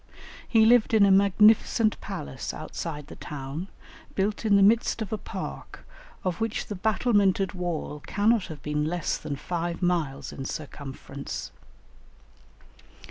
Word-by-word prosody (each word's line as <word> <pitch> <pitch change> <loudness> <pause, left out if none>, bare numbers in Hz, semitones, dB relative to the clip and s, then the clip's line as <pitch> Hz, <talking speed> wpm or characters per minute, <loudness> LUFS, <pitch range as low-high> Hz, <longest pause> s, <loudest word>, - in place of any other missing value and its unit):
He 225 -2 +5
lived 235 -1 +5
in 205 -2 +7
a 195 - +5
magnificent 210 +3 +4
palace 160 -9 -5
outside 155 -1 -5
the - - -11
town, 145 +5 -6 0.5
built 205 +3 -1
in 205 -2 +5
the 200 - +6
midst 230 +3 +3
of 215 - -6
a - - 0
park, - - -7 0.4
of 185 +1 -2
which 225 -1 -1
the - - -5
battlemented 200 -2 +2
wall 170 -5 -4
cannot 210 0 +2
have 155 -3 -9
been 150 0 -1
less 175 0 -1
than 145 - -4
five 170 +4 -3
miles 145 -6 -1
in 135 - -6
circumference. 145 -2 -6
185 Hz, 135 wpm, -27 LUFS, 150-210 Hz, 0.5 s, in